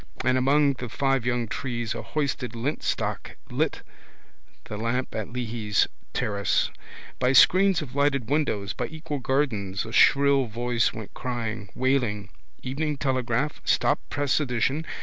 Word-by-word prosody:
And 130 0 +3
among 140 +2 +4
the 125 -2 -6
five 135 0 0
young 120 -1 0
trees 120 -1 -3
a - - -5
hoisted 140 -5 -2
lintstock 130 +7 -2
lit - - -1 0.8
the 105 - -7
lamp 115 +4 -2
at 110 +1 -4
Leahy's 115 -4 0 0.2
terrace. 100 -2 0 0.5
By 125 +1 +3
screens 185 +5 +6
of 130 -4 -10
lighted 140 -4 +1
windows, 110 -10 0
by 120 - -3
equal 155 -1 -5
gardens 115 -8 -1
a 110 - -7
shrill 140 +1 +5
voice 120 +1 0
went 110 -3 -9
crying, 115 -4 -4
wailing: 120 -6 0 0.3
_Evening 145 +3 -2
Telegraph, 130 0 -1
stop - - +2
press 145 0 +1
edition! 135 +3 0
125 Hz, 135 wpm, -26 LUFS, 115-140 Hz, 0.8 s, screens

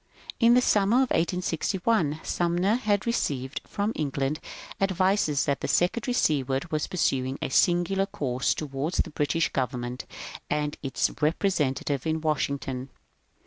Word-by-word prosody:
In 235 0 +6
the 250 - +5
summer 205 0 +3
of 260 0 +3
1861 175 -1 0
Sumner 175 +4 +1
had 210 -5 +1
received 140 - -1
from 205 +2 -1
Eng 145 -3 -2
land 140 +3 0 0.4
advices 190 -5 +2
that 140 -2 -1
Secretary 235 +9 +1
Seward 140 - 0
was 155 -1 0
pursuing 135 -6 0
a - - -3
singular 175 +6 +2
course 130 -8 -1
towards 145 +3 -3
the - - 0
British 150 +2 0
government 125 -1 -3 0.4
and 150 0 -1
its 135 -2 0
represent 150 -3 +1
ative 140 +1 -1
at 160 - -5
Washington. 140 -4 -1
155 Hz, 135 wpm, -27 LUFS, 140-195 Hz, 0.4 s, In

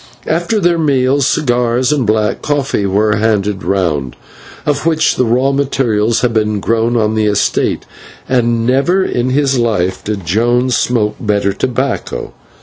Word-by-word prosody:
After 175 +7 0
their 175 -3 +1
meal, 140 -2 +1
cigars 125 -1 +1
and 140 -6 0
black 105 -1 0
coffee 140 -8 -1
were 105 +2 +1
handed 105 -2 0
round, 80 -9 -1 0.5
of 145 -1 0
which 160 -1 +1
the 125 - +1
raw 125 +4 +2
materials 120 -5 0
had 125 -2 0
been 105 -2 0
grown 115 +3 0
on 110 -1 +1
the 110 -1 0
estate, 105 -1 0 0.4
and 120 -2 +1
never 140 +10 +2
in 120 +1 -1
his 135 -1 +1
life 95 -6 -1
did 100 -4 -4
Jones 120 +7 +1
smoke 105 -2 0
better 100 -2 0
tobacco. 130 +6 -3
120 Hz, 145 wpm, -14 LUFS, 105-135 Hz, 0.5 s, raw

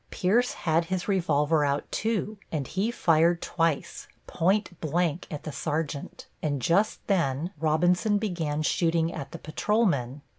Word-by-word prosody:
Pierce 230 +7 +1
had 165 0 +1
his 180 +1 -3
revolver 160 -5 +2
out, 140 0 0
too, 215 -1 -1
and 150 -4 -2
he 195 - -1
fired 170 -6 +3
twice, 165 -4 -1 0.2
point 185 0 0
blank 170 +1 0
at 150 - -6
the 155 - -5
sergeant, 150 -1 -4 0.2
and 145 -3 -1
just 175 - +1
then 165 -4 0
Robinson 175 +7 +2
began 165 -8 -2
shooting 165 0 +1
at 140 -4 -6
the - - -6
patrolmen. 155 - 0
165 Hz, 140 wpm, -27 LUFS, 150-185 Hz, 0.2 s, fired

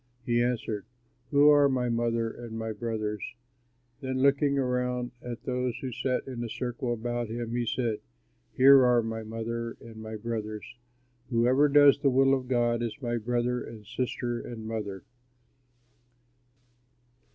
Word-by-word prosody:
He 120 0 +2
answered, 115 -4 -2 0.4
"Who 145 +1 +6
are 145 -1 +6
my 125 -2 0
mother 115 -1 0
and 115 -2 -8
my 110 0 -3
brothers?" 110 -2 -3 0.8
Then 130 -2 -3
looking 140 0 +3
around 125 -1 -1
at 120 -1 -7
those 125 -2 -2
who 130 - -5
sat 125 +2 -1
in 125 -3 -5
a 115 - -4
circle 120 +1 -3
about 120 0 -2
him, 115 0 -4
he 120 -1 -1
said, 115 -1 -1 0.5
"Here 135 0 +7
are 120 -2 +4
my 110 0 -4
mother 115 +1 -4
and 115 -1 -12
my 110 0 -7
brothers. 110 -1 -4 0.6
Whoever 130 +4 +3
does 145 -1 +6
the 140 - +3
will 135 +1 +4
of 130 -2 -1
God 120 -2 +1
is 120 +3 -3
my 120 -3 -2
brother 120 +2 -1
and 110 -2 -10
sister 120 0 -2
and 110 -2 -7
mother." 105 -4 -4
120 Hz, 150 wpm, -28 LUFS, 115-125 Hz, 0.8 s, Here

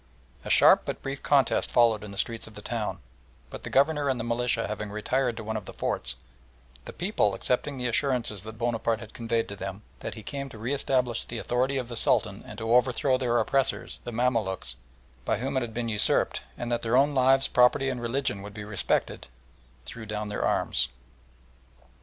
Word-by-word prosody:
A - - -6
sharp - - +7
but - - -5
brief 135 0 -4
contest 140 -3 +2
followed 115 -3 +4
in 105 - -7
the 100 - -9
streets 115 +2 -2
of 110 - -14
the 105 - -10
town, 115 -3 -2 0.5
but - - -8
the - - -5
Governor 145 +1 +3
and 130 -2 0
the - - -2
militia 120 0 0
having 105 0 -4
retired 120 +3 -1
to 110 - -5
one 110 +1 -3
of 105 -3 -4
the - - -9
forts, - - -1 0.7
the - - -7
people, 170 - 0
accepting 135 +2 -1
the 125 - -3
assurances 120 -4 +1
that 110 +2 -9
Bonaparte 115 -1 0
had 115 -2 -11
conveyed 115 -1 -1
to 100 - -7
them, 95 +1 -6 0.2
that - - -6
he 110 - -9
came 140 +3 -5
to 115 - -11
re 120 +6 -2
establish 125 -4 0
the 120 - -6
authority 130 +4 0
of 125 -2 -2
the 120 - -6
Sultan 105 -2 +2
and 105 - -9
to 115 +1 0
overthrow 125 +2 +3
their 125 -2 +1
oppressors, 135 +2 0
the 120 - -5
Mamaluks, 115 -5 0 0.5
by - - 0
whom 130 +5 -3
it 130 - +2
had 120 -2 -4
been 120 -1 -1
usurped, 105 -2 +2 0.2
and 120 0 -4
that 120 - 0
their 115 +2 +2
own 145 +2 +4
lives, 135 0 +4
property, 125 +2 +4
and 125 -2 -2
religion 120 -3 -1
would 100 +1 -9
be 105 - -6
respected, 105 -2 -1 0.6
threw 110 - -8
down 105 0 -3
their 105 - -2
arms. - - +1
120 Hz, 205 wpm, -27 LUFS, 110-130 Hz, 0.7 s, sharp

